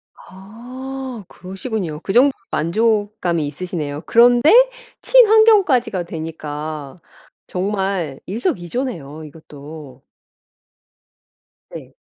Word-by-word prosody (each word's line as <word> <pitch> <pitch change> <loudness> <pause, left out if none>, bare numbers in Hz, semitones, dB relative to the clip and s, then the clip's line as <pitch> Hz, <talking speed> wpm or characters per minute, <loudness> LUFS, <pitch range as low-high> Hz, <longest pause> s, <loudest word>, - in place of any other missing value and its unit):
아 245 +4 -9
그러시군요. 185 -3 -6
그 195 - -3
정도로 265 +4 +5 0.2
만족감이 205 -2 0
있으시네요. 150 -2 -5
그런데 245 +5 +5 0.5
친환경까지가 420 - +4
되니까 155 -2 -7 0.5
정말 190 -6 -3
일석이조네요 175 - -4
이것도. 150 -2 -12 1.7
네. - - -10
190 Hz, 215 characters per minute, -19 LUFS, 155-245 Hz, 1.7 s, 정도로